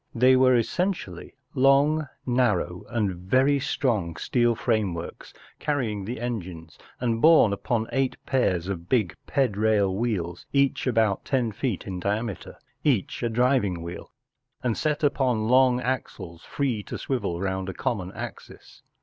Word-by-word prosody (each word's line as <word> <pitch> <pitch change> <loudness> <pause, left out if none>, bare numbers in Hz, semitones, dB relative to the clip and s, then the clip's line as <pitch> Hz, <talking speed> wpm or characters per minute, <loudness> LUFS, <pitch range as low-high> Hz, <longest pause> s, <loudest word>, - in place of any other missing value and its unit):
They 130 +2 +5
were 130 0 +5
essentially 120 - -2 0.2
long, 140 +3 +3 0.2
narrow, 110 -9 0
and 105 -5 0
very 130 +11 +2
strong 115 - -1
steel 120 +6 +1
frameworks 100 -8 -2 0.3
carrying 115 -10 -2
the 115 +3 -5
engines, 90 -10 -6 0.2
and 115 -2 -1
borne 155 -10 +6
upon 110 +2 -1
eight 135 -1 0
pairs 95 -10 +1
of 90 -3 -5
big 110 -10 +1
|>edraiI 110 -6 +2
wheels, 95 -6 -2
each 140 -1 +2
about 110 -5 +2
ten 125 -4 0
feet 110 0 -3
in 95 -2 -5
diameter, 105 +2 -3 0.3
each 125 -11 0
a 120 - 0
driving 115 -7 +1
wheel 85 +1 -8 0.5
and 120 -3 0
set 150 0 -1
upon 125 -6 +1
long 125 0 +4
axles 120 -9 -4
free 130 -7 -2
to - - -7
swivel 120 -10 -2
round 95 0 -2
a - - -4
common 105 -9 -2
axis. - - -9
115 Hz, 140 wpm, -25 LUFS, 95-130 Hz, 0.5 s, borne